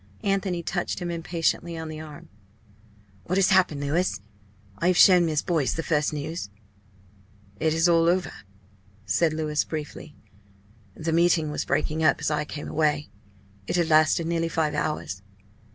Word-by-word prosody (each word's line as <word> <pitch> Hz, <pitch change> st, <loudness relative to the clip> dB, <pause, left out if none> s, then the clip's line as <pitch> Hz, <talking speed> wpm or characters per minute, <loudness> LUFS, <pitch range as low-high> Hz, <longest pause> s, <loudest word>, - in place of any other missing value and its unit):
Anthony 195 Hz, -3 st, -1 dB
touched 175 Hz, +2 st, -2 dB
him 175 Hz, -1 st, -4 dB
impatiently 170 Hz, 0 st, -2 dB
on 160 Hz, 0 st, -5 dB
the 155 Hz, 0 st, -7 dB
arm. 155 Hz, -2 st, -11 dB, 1.0 s
"What 185 Hz, -, -1 dB
has 195 Hz, 0 st, +3 dB
happened, 180 Hz, -6 st, +3 dB
Louis? 155 Hz, -, 0 dB, 0.6 s
I 170 Hz, -, +1 dB
have 180 Hz, -1 st, +3 dB
shown 180 Hz, -3 st, +7 dB
Miss 155 Hz, -2 st, 0 dB
Boyce 160 Hz, -6 st, 0 dB
the 165 Hz, -, -3 dB
first 150 Hz, -3 st, +1 dB
news." 150 Hz, -, -5 dB, 1.1 s
"It 160 Hz, -, +1 dB
is 165 Hz, +2 st, +3 dB
all 165 Hz, -1 st, +4 dB
over," 180 Hz, +1 st, 0 dB, 0.7 s
said 115 Hz, +11 st, +2 dB
Louis, 155 Hz, -1 st, -1 dB
briefly. 155 Hz, -1 st, -7 dB, 0.8 s
"The 160 Hz, 0 st, -3 dB
meeting 165 Hz, -2 st, +2 dB
was 150 Hz, -, -3 dB
breaking 155 Hz, +1 st, -1 dB
up -, -, +3 dB
as 155 Hz, 0 st, -1 dB
I 150 Hz, 0 st, -1 dB
came 150 Hz, 0 st, -7 dB
away. 150 Hz, -1 st, 0 dB, 0.6 s
It -, -, -1 dB
had 170 Hz, -2 st, +1 dB
lasted 155 Hz, +2 st, +4 dB
nearly 165 Hz, 0 st, -1 dB
five 160 Hz, -2 st, 0 dB
hours. 95 Hz, -11 st, -3 dB
160 Hz, 155 wpm, -25 LUFS, 150-170 Hz, 1.1 s, shown